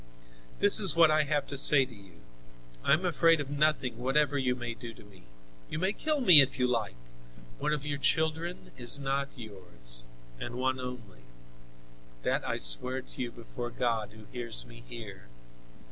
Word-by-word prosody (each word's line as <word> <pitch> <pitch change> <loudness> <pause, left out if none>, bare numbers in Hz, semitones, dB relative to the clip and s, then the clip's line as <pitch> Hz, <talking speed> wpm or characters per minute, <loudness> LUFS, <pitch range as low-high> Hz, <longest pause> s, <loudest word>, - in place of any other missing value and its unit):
"This 205 - +8
is 190 -6 +4
what 165 -2 +5
I 155 0 +2
have 145 -1 -1
to 140 - -8
say 135 0 +6
to 125 - -15
you. 95 - -18 0.6
I - - +3
am 170 +5 0
afraid 165 -1 +2
of 145 -1 -6
nothing, 145 -5 0
whatever 145 +3 0
you 130 -2 -1
may 120 -1 -6
do 115 -1 -11
to - - -16
me. 100 -6 -19 0.4
You - - -5
may 190 +5 -1
kill 305 +2 0
me 180 - +9
if 135 0 -1
you 125 - +1
like. 115 - -2 0.6
One - - -2
of 150 -1 -3
your 145 -1 -4
children 160 +4 -2
is 120 +2 +5
not 140 0 -2
yours, - - -5 0.3
and 120 - -7
one 130 +1 -2
only; 125 - -9 1.0
that - - -1
I - - -2
swear 125 - 0
to - - -10
you 120 -1 -4
before 120 +1 -8
God, 115 -3 -3
who 110 -1 -15
hears 120 -2 -2
me 115 0 -15
here. 105 - -11
130 Hz, 180 wpm, -28 LUFS, 115-150 Hz, 1.0 s, me